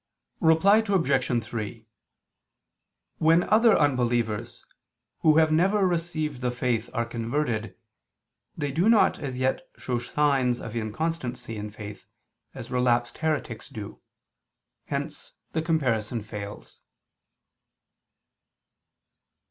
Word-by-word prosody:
Reply 165 +6 +5
Obj. 140 - +1
3: 110 0 -6 1.3
When 165 +2 +5
other 225 +1 +5
unbelievers, 120 -5 0 0.5
who 155 -1 +4
have 160 -1 +5
never 190 +5 +3
received 160 -6 -2
the 125 - 0
faith 120 -2 -1
are 115 -1 -1
converted, 115 -2 -2 0.8
they 145 -3 -2
do 170 +10 +2
not 225 -2 +4
as 135 -4 -4
yet 130 +5 0 0.2
show 125 -2 -2
signs 130 -1 +1
of 115 0 -7
inconstancy 125 +1 -3
in 105 0 -5
faith, 105 -1 -10 0.5
as - - -8
relapsed 120 -1 +1
heretics 150 -8 -2
do; 110 -7 -8 0.8
hence - - -5 0.2
the 160 - -1
comparison 125 -9 0
fails. 105 -1 -8
125 Hz, 100 wpm, -26 LUFS, 115-160 Hz, 1.3 s, Reply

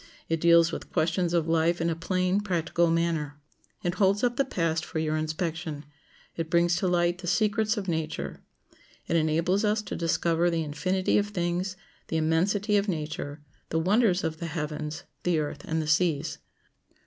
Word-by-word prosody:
It 165 -1 0
deals 170 0 +6
with - - -7
questions 170 +1 +1
of 170 -2 +1
life 165 +1 +2
in 165 - 0
a 165 - 0
plain, 185 +3 0
practical 170 -3 +1
manner. 165 -3 0 0.4
It 175 - 0
holds 195 +3 +2
up 245 -1 +2
the 275 - +3
past 165 -10 -1
for 170 - -6
your 155 -1 0
inspection. 155 -1 -3 0.5
It 165 -1 -3
brings 170 +1 +3
to 185 - 0
light 175 0 +2
the 180 - -7
secrets 215 +3 +2
of 200 -2 -3
nature. 160 -3 -3 0.7
It - - 0
enables 165 +5 +2
us 215 0 +1
to - - -5
discover 170 0 +1
the 165 -1 0
infinity 185 +7 +1
of 205 - -1
things, 180 -1 -2 0.3
the 160 - -1
immensity 195 +7 +2
of 200 +1 +1
nature, 150 -3 -4 0.3
the 160 - 0
wonders 190 +2 +3
of 160 -1 -2
the 170 - -4
heavens, 155 0 -4 0.2
the 175 -2 +1
earth, 150 -1 -3
and 160 0 -1
the 155 - -2
seas. 155 -2 +1
170 Hz, 175 wpm, -27 LUFS, 160-185 Hz, 0.7 s, deals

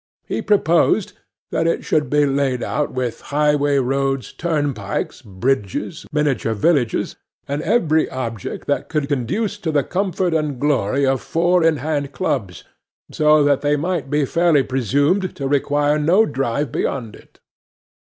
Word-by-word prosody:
He - - -3
proposed 195 0 +2 0.4
that 165 - +1
it 165 - -1
should 150 -1 +1
be 150 0 +3
laid 135 -2 0
out 150 - -1
with 125 -3 -3
highway 145 -1 +2
roads, 135 0 -1
turnpikes, 145 - -2
bridges, 110 - -2
miniature 145 -7 0
villages, 125 0 +1 0.3
and 140 +2 -2
every 160 -7 +2
object 115 -5 -5
that - - -1
could 150 -2 -1
conduce 185 - -2
to 165 -5 -2
the 145 -2 +2
comfort 185 +1 -1
and 150 -5 -1
glory 140 -2 +1
of 135 -1 +1
Four 175 +1 +2
in 160 -2 +3
hand 145 0 -2
Clubs, 105 -7 -2 0.5
so 150 -1 +4
that 145 -1 +2
they 145 0 +2
might 160 -2 -2
be 145 0 +1
fairly 165 -1 +3
presumed 145 - 0
to 140 - -3
require 145 +1 +1
no 180 +9 +4
drive 135 -1 -2
beyond 115 -7 -3
it. - - -20
145 Hz, 145 wpm, -20 LUFS, 135-160 Hz, 0.5 s, so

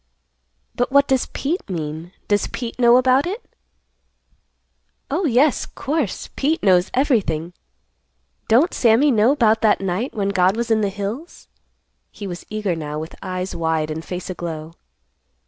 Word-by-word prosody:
"But 245 +2 -1
what 280 0 +5
does 265 -2 +1
Pete 310 - -3
mean? 160 0 -5 0.2
Does 205 -1 +1
Pete 240 -1 -6
know 240 0 +6
about 260 +4 +3
it?" 415 +7 -5 1.7
"Oh, 340 +6 0
yes, 270 +1 +2
course 285 -6 -3
Pete 310 +4 0
knows 185 -1 +4
everything. 190 - +1 0.9
Don't 270 +11 +4
Sammy 240 +5 +4
know 230 +4 +4
'bout 225 -4 +3
that 215 -2 +3
night 195 +8 -2
when 200 -2 0
God 190 +1 +2
was 235 0 -2
in 220 -1 +3
the 205 - +1
hills?" 205 - -6 0.6
He 205 - -9
was 175 -2 -7
eager 210 -4 -1
now, 150 -2 -5
with 160 +2 -6
eyes 185 -1 -4
wide 160 -2 -1
and 160 +1 -5
face 180 +1 -6
aglow. 165 -3 -6
210 Hz, 145 wpm, -21 LUFS, 180-260 Hz, 1.7 s, know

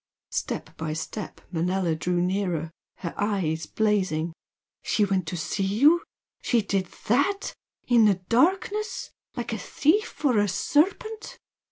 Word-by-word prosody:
Step - - -3
by 160 -1 -3
step 175 +6 -5
Manella 180 0 +1
drew 175 +3 0
nearer, 180 -4 -1 0.2
her 170 -3 -5
eyes 185 -6 0
blazing. 185 -7 +1 0.5
"She 210 - +2
went 190 -4 0
to 175 - -3
see 170 +5 -2
you? 280 - +5 0.4
She 235 -4 +2
did 195 -2 0 0.2
THAT! 375 - +1 0.3
In 235 -3 +6
the 205 -2 +5
darkness? 370 - +1 0.2
like 235 -3 -3
a 220 - -3
thief 315 - +1
or 245 -6 +4
a 205 - +3
serpent!" 400 - 0
205 Hz, 135 wpm, -26 LUFS, 180-270 Hz, 0.5 s, In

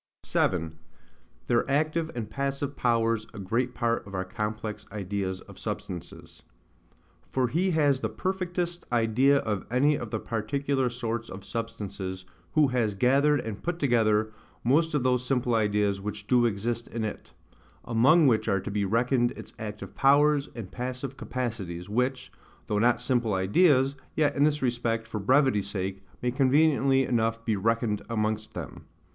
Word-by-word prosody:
7. 80 -3 0 0.7
Their 120 +2 +1
active 155 +3 +1
and 115 -3 -3
passive 140 +3 -3
Powers 115 -2 +1
a - - -8
great 115 +6 -1
part 115 -3 0
of 100 - -7
our 95 0 -2
complex 105 +1 -4
Ideas 100 -2 -3
of - - -14
Substances. 90 -3 -7 0.9
For 130 -2 +1
he 180 +8 +1
has 145 -3 +3
the 110 - -2
perfectest 175 - -2
idea 120 +4 +3
of 105 -7 -2
any 140 +5 +3
of 120 - -6
the 110 -1 -2
particular 130 +5 -1
sorts 115 -1 -4
of 95 +1 -9
substances, 100 -4 -5 0.3
who 150 -3 +4
has 115 -5 0
gathered, 140 +5 +3
and 105 -3 -6
put 175 0 -2
together, 110 -7 +2 0.3
most 150 +6 +2
of 140 - +1
those 125 -1 +2
simple 125 -2 0
ideas 105 -2 +1
which 105 0 -5
do 120 +1 +4
exist 115 +2 -2
in 115 -1 -4
it; 105 - -6 0.5
among 135 +8 +5
which 115 -5 +3
are 100 - +2
to 100 - -5
be 105 0 0
reckoned 120 +4 +2
its - - -11
active 105 -2 -7
powers, 145 +1 +4
and 110 -6 -7
passive 130 +2 -5
capacities, 105 -11 -4
which, 125 +4 -1 0.3
though 105 -2 0
not 120 +3 +3
simple 120 -6 0
ideas, 135 - +3 0.2
yet 150 -2 +2
in 140 - +4
this 150 -2 +1
respect, 120 -2 -1
for 105 - -4
brevity's 125 -2 +3
sake, 95 -1 -3 0.2
may 125 - +1
conveniently 135 0 +3
enough 115 -2 0
be 110 - +1
reckoned 110 +1 0
amongst 110 -1 -2
them. - - -7
120 Hz, 155 wpm, -27 LUFS, 105-135 Hz, 0.9 s, among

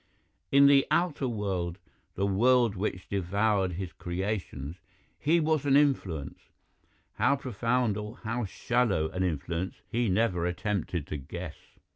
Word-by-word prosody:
In 140 0 +7
the 140 -1 +6
outer 155 -4 +1
world, 95 -6 -2 0.4
the 100 - 0
world 120 +2 +3
which 95 -1 -3
devoured 100 0 +1
his 90 0 -5
creations, 90 -5 -4 0.4
he 165 +4 +3
was 155 -2 +1
an 140 -1 +3
influence; 100 - +1 0.8
how 140 - +4
profound 125 -3 0
or 105 +2 -6
how 115 +1 -2
shallow 100 -6 0
an 90 - -3
influence 85 +1 -2 0.2
he 120 -1 +1
never 90 -3 +1
attempted 90 -3 -2
to 75 - -4
guess. 80 +4 -7
100 Hz, 130 wpm, -29 LUFS, 90-125 Hz, 0.8 s, In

